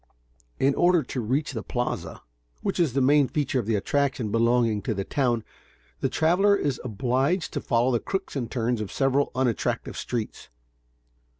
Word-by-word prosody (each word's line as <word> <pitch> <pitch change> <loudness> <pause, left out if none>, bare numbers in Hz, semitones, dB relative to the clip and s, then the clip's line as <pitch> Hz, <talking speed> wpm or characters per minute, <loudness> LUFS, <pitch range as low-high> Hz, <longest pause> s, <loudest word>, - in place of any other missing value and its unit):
In 135 +1 +3
order 175 +1 +3
to 130 - -4
reach 135 +6 -1
the 110 - -3
Plaza, 125 0 -4 0.4
which - - -1
is 160 -8 +2
the 135 - +1
main 140 +1 +4
feature 140 -3 -1
of 115 -2 -4
attraction 120 +2 0
belonging 115 -2 +2
to 115 -2 -2
the 95 - -2
town, 120 -1 0 0.6
the - - 0
traveler 185 +6 +3
is 145 -9 -1
obliged 130 - 0
to - - -2
follow 120 +2 +2
the 120 - +2
crooks 195 - -4
and 120 -5 -2
turns 120 -2 -1
of 105 - -5
several 135 +1 +1
unattractive 125 -3 -1
streets. 115 -3 -4
130 Hz, 165 wpm, -26 LUFS, 115-145 Hz, 0.6 s, main